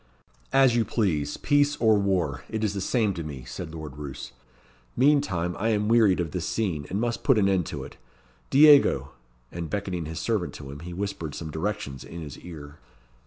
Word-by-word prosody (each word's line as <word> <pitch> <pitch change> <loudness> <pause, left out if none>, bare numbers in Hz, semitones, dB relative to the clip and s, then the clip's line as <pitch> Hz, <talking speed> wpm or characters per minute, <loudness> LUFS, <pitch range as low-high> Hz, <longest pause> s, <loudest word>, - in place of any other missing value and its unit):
"As 135 -3 +5
you 120 - +3
please 85 -10 -1
peace 145 0 +2
or 110 -6 +4
war; 95 -8 0
it 110 0 -3
is 105 -2 0
the 100 - -3
same 110 0 +1
to 85 -2 -5
me," 70 -4 -7
said 80 +5 -7
Lord 75 -3 -8
Roos. 70 -3 -7 0.7
"Meantime, 120 - +2
I 110 +3 +1
am 105 -1 +1
wearied 110 -6 +4
of 85 -3 -2
this 90 +1 -3
scene, 85 -10 -2
and 100 - -2
must 120 0 -2
put 135 -5 +4
an 100 -2 +3
end 95 -4 +1
to - - -5
it. - - -11 0.5
Diego!" 145 +1 +6 0.4
And 85 -2 -5
beckoning 95 -5 -3
his 80 +1 -5
servant 105 -4 -1
to 70 -2 -8
him, 70 - -8
he 85 +3 -8
whispered 85 -5 -4
some 80 -2 -6
directions 80 -6 -4
in 85 - -9
his 75 -3 -8
ear. 75 -4 -10
95 Hz, 195 wpm, -26 LUFS, 80-110 Hz, 0.7 s, Diego